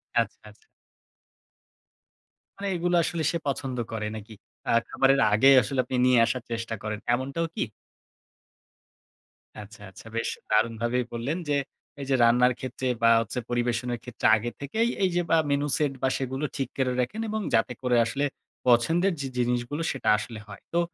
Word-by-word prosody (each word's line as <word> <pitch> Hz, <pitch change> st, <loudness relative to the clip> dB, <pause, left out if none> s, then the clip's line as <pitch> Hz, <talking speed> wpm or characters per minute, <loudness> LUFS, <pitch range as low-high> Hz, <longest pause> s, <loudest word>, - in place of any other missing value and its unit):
আচ্ছা, -, -, +1 dB
আচ্ছা। 435 Hz, -, -21 dB, 1.9 s
মানে 200 Hz, 0 st, -2 dB
এগুলা 175 Hz, 0 st, +1 dB
আসলে 165 Hz, -1 st, -2 dB
সে 170 Hz, -, -1 dB
পছন্দ 135 Hz, -2 st, -2 dB
করে 105 Hz, -1 st, -3 dB
নাকি? 110 Hz, +1 st, -9 dB, 0.4 s
আ -, -, +3 dB, 0.2 s
খাবারের 135 Hz, 0 st, +3 dB
আগে 110 Hz, +6 st, +4 dB
আসলে 130 Hz, +4 st, -3 dB
আপনি 130 Hz, -, -3 dB
নিয়ে 125 Hz, -1 st, +5 dB
আসার 125 Hz, +1 st, -2 dB
চেষ্টা 115 Hz, 0 st, -3 dB
করেন, 105 Hz, -1 st, -3 dB
এমনটাও 140 Hz, +7 st, -1 dB
কি? -, -, -3 dB, 2.0 s
আচ্ছা, 105 Hz, +1 st, -13 dB
আচ্ছা। 95 Hz, -, -15 dB
বেশ 115 Hz, -, -1 dB, 0.2 s
দারুণভাবেই 115 Hz, +3 st, +1 dB
বললেন, 130 Hz, +9 st, -2 dB
যে -, -, +2 dB, 0.5 s
এইযে 135 Hz, -1 st, 0 dB
রান্নার 125 Hz, +2 st, +5 dB
ক্ষেত্রে 130 Hz, 0 st, -4 dB
বা 115 Hz, -, +5 dB
হচ্ছে 115 Hz, +2 st, -4 dB
পরিবেশনের 120 Hz, 0 st, -1 dB
ক্ষেত্রে, 125 Hz, -1 st, -7 dB
আগে 120 Hz, +2 st, -3 dB
থেকেই 220 Hz, -, 0 dB
এইযে 175 Hz, -2 st, +2 dB
আ -, -, +5 dB
মেনু 140 Hz, +1 st, +1 dB
সেট 145 Hz, -3 st, 0 dB
বা 130 Hz, -, +2 dB
সেগুলো 135 Hz, +2 st, -3 dB
ঠিক 135 Hz, -, -1 dB
করে 130 Hz, -1 st, +1 dB
রাখেন। 170 Hz, -, -1 dB
এবং 215 Hz, 0 st, -2 dB
যাতে 115 Hz, +2 st, +2 dB
করে 125 Hz, -1 st, +2 dB
আসলে 140 Hz, +4 st, -1 dB, 0.4 s
পছন্দের 165 Hz, +11 st, +3 dB
যে 135 Hz, -, -3 dB
জিনিসগুলো 125 Hz, +5 st, -1 dB
সেটা 135 Hz, -, -2 dB
আসলে 110 Hz, +1 st, -6 dB
হয়। 100 Hz, -2 st, -11 dB
তো 170 Hz, -, +3 dB
125 Hz, 160 wpm, -26 LUFS, 115-140 Hz, 2.0 s, নিয়ে